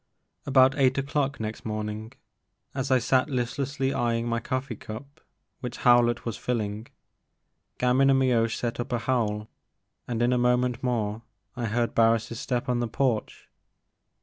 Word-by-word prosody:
ABOUT 130 -1 +5
eight 130 0 +3
o'clock 140 0 -1
next 110 0 -5
morning, 110 +1 -4 0.6
as 135 0 -2
I 130 - +5
sat 130 +3 +2
listlessly 135 +2 -1
eyeing 120 -2 0
my 115 0 0
coffee 130 0 -3
cup 140 +10 -10 0.4
which 125 -2 -6
How 120 0 +6
lett 120 0 -1
was 115 -3 -2
filling, 110 -2 -3 0.9
Gamin 130 +2 +3
and 135 - +5
Mioche 120 -4 +2
set 120 -1 -3
up 120 +2 -4
a - - +2
howl, 110 -4 -1 0.6
and 120 -1 -1
in 120 +1 +3
a 125 - +2
moment 125 0 +2
more 115 -4 -1 0.3
I 120 -2 -2
heard 115 +2 0
Harris' 115 0 +2
step 125 -2 -2
on 125 -1 +1
the 120 - 0
porch. 120 -1 -1
120 Hz, 155 wpm, -26 LUFS, 115-130 Hz, 0.9 s, How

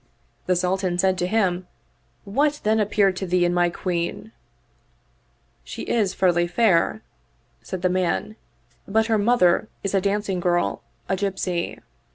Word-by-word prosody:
The 180 - +3
Sultan 180 0 0
said 190 +1 +2
to 180 - 0
him, 185 -4 0 0.3
" - - -41 0.2
What 290 +8 0
then 220 +1 +2
appeared 205 -2 +2
to 190 - -3
thee 175 0 +2
in 175 - +1
my 175 0 +3
Queen? 175 +4 -3 0.5
" - - -40
" - - -41 0.3
She - - -7
is 210 -5 0
ferly 175 -2 +2
fair," 210 +1 +2 0.6
said 185 -1 -6
the - - +4
man, 185 +3 -1 0.3
" - - -37
but 220 +2 +2
her 220 -1 +1
mother 205 -3 +3 0.2
is 195 - -2
a 195 - +3
dancing 200 -1 -1
girl, 175 0 0 0.3
a 190 - 0
gypsy." 185 -3 -2
190 Hz, 165 wpm, -23 LUFS, 180-210 Hz, 0.6 s, the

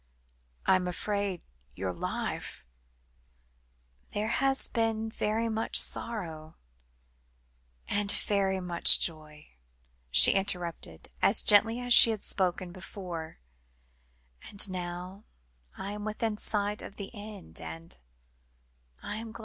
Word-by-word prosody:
"I 190 - +4
am 180 -1 -4
afraid 200 0 -3 0.3
your 95 0 -4
life - - -5 0.7
" - - -39
"There 210 +1 -2
has 270 +3 +1
been 225 -1 -2
very 220 +2 -2
much 225 0 +1
sorrow 160 -8 -2 1.3
and 205 0 0
very 195 -2 -1
much 175 -2 +5
joy," 155 -2 -5 0.6
she 60 - +8
interrupted, 180 -4 -3
as - - +5
gently 225 +3 +4
as 245 0 +1
she 235 - +10
had 220 -3 -3
spoken 185 -1 -2
before; 180 -3 -8 1.1
"and 200 0 +6
now 180 +2 -7 0.5
I 195 - -5
am 205 0 -7
within 215 +1 -3
sight 210 0 -2
of 200 - -10
the 200 - -8
end, 205 - -9
and 80 -2 -8 1.1
I 205 - -5
am 225 0 -8
glad." 235 - -12
195 Hz, 115 wpm, -28 LUFS, 165-215 Hz, 1.3 s, she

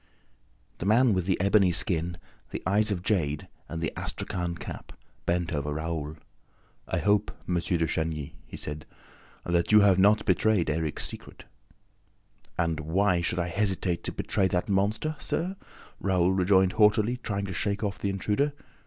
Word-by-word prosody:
The 90 - -3
man 115 +2 +5
with 90 -2 -1
the 95 - +1
ebony 100 -1 +4
skin, 85 -1 +1 0.3
the - - -6
eyes 105 +3 +3
of 95 -4 -2
jade 75 -9 0 0.2
and 85 - -4
the 80 -2 -2
astrakhan 90 -2 -3
cap - - -8 0.3
bent 85 -1 0
over 75 0 -2
Raoul. 80 -1 -3 0.7
"I - - -1
hope, 105 0 +2 0.2
M. 90 - -1
de 85 -1 +1
Chagny," 80 -3 -2
he - - -8
said, 75 +1 -6 0.6
"that 85 +1 +1
you 105 0 +8
have 100 -2 +5
not 105 +2 +4
betrayed 95 -3 +2
Erik's 80 -1 -2
secret?" - - -10 1.1
"And 85 -2 0
why 90 +3 +1
should 85 +1 -1
I 90 0 -1
hesitate 95 -2 0
to - - -1
betray 95 -3 0
that 90 -1 -1
monster, 105 +10 0
sir?" 180 +4 -2 0.4
Raoul 95 -2 +2
rejoined 95 0 +4
haughtily, 110 +3 +3
trying 100 -5 -3
to 95 - -5
shake 100 +4 -1
off 100 -1 -2
the 100 - -1
intruder. 105 +9 0
95 Hz, 160 wpm, -27 LUFS, 85-105 Hz, 1.1 s, you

